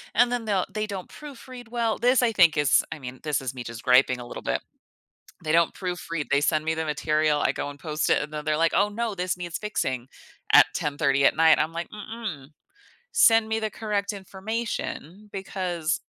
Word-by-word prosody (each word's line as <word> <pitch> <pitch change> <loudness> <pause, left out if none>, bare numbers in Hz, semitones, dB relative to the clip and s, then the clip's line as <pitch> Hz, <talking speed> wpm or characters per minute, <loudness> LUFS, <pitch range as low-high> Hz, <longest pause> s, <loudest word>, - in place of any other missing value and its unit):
and 245 0 +4
then 240 -2 -2
they'll 195 -4 +1
they 215 0 -2
don't 195 -3 -6
proofread 255 -4 -11
well 235 -2 0
this 250 +2 +3
I 230 - +3
think 180 -7 +5
is 145 -3 +4
I 160 - -10
mean, 130 -1 -8
this 150 -3 0
is 130 -1 -4
me 125 - -6
just 115 0 -8
griping 125 0 +4
a 120 - -9
little - - -8
bit. 60 - -1 0.8
They 155 - 0
don't 170 0 +4
proofread, 175 -4 -4
they 140 - +4
send 155 +1 +1
me 160 - +1
the 160 0 -2
material, 150 0 +1
I - - +2
go 145 - -4
and 145 - -12
post 150 +1 -2
it, - - +4
and 150 - -6
then 150 0 -5
they're 155 -1 +1
like, 165 0 +3
"Oh, 200 +1 +3
no, 225 0 -2
this 180 0 -2
needs 175 -1 -4
fixing," 130 - -3 0.4
at - - +9
10:30 140 -1 +1
at - - +5
night. 160 0 +6
I'm 155 +2 0
like, 170 +1 -5
"Mm-mm, 210 - -7 0.7
send 225 -1 +5
me 220 0 0
the 215 - -1
correct 210 -1 -2
information 200 -1 -5
because, 180 -4 -2
170 Hz, 210 wpm, -25 LUFS, 150-215 Hz, 0.8 s, at